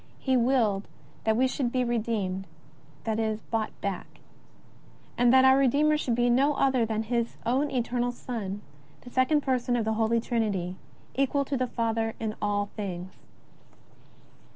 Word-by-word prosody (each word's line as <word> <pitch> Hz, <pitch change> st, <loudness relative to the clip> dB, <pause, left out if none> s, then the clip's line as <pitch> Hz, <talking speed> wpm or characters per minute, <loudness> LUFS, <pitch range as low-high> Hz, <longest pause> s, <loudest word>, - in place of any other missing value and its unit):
He 260 Hz, -1 st, 0 dB
willed 235 Hz, -5 st, +2 dB, 0.4 s
that 220 Hz, 0 st, +3 dB
we 255 Hz, -, +4 dB
should 255 Hz, -2 st, -1 dB
be 255 Hz, 0 st, +1 dB
redeemed; 215 Hz, -5 st, -1 dB, 0.6 s
that 220 Hz, 0 st, -1 dB
is, 220 Hz, -1 st, -1 dB
bought 225 Hz, -2 st, -1 dB
back; 200 Hz, -2 st, -5 dB, 1.0 s
and 245 Hz, 0 st, +4 dB
that 260 Hz, 0 st, +6 dB
our 265 Hz, 0 st, +7 dB
Redeemer 285 Hz, +3 st, +3 dB
should 255 Hz, -6 st, 0 dB
be 240 Hz, +1 st, +2 dB
no 275 Hz, +4 st, +3 dB
other 260 Hz, -4 st, +2 dB
than 220 Hz, 0 st, -1 dB
His 235 Hz, +1 st, -1 dB
own 270 Hz, +5 st, +1 dB
Eternal 245 Hz, -1 st, 0 dB
Son, 210 Hz, -5 st, -5 dB, 0.4 s
the 245 Hz, -, -12 dB
Second 265 Hz, +4 st, +3 dB
Person 255 Hz, -3 st, 0 dB
of 230 Hz, -2 st, 0 dB
the 220 Hz, -, +1 dB
Holy 225 Hz, +1 st, +2 dB
Trinity, 205 Hz, -7 st, -1 dB, 0.4 s
equal 275 Hz, +1 st, +1 dB
to 280 Hz, -, -2 dB
the 255 Hz, -1 st, 0 dB
Father 225 Hz, -1 st, -1 dB
in 220 Hz, -1 st, -2 dB
all 205 Hz, -1 st, 0 dB
things. 185 Hz, -3 st, -5 dB
235 Hz, 155 wpm, -28 LUFS, 215-255 Hz, 1.0 s, our